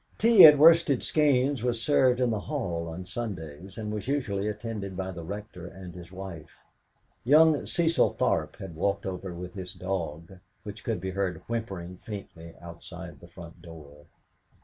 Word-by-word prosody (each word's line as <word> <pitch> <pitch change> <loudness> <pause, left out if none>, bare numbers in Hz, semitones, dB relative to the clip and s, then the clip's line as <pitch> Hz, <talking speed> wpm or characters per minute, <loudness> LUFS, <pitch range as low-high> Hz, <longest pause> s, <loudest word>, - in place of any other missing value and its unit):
Tea 225 -4 +8
at 150 -1 +7
Worsted 160 -3 +6
Skeynes 140 -4 +2
was 120 -1 -1
served 130 -1 +3
in 125 -2 +2
the 110 - -1
hall 95 - -3
on 85 +3 -7
Sundays, 95 -4 -6
and 105 -1 -4
was 105 +2 -5
usually 105 -8 -1
attended 105 -3 -5
by 95 0 -3
the 85 -2 -8
Rector 100 -1 -8
and 90 -1 -10
his 90 0 -11
wife. 95 -5 -10 0.6
Young 155 +3 +5
Cecil 170 -1 +2
Tharp - - 0
had 95 -3 -9
walked 100 +5 -1
over 95 0 -5
with 90 +1 -8
his 95 -2 -7
dog, 90 -1 -5 0.2
which 105 0 -9
could 115 -2 -2
be 95 - -3
heard 95 -3 -3
whimpering 95 -6 -5
faintly 85 -5 -9
outside - - -10
the 85 - -14
front 85 -1 -13
door. 75 -3 -13
95 Hz, 165 wpm, -27 LUFS, 90-120 Hz, 0.6 s, Tea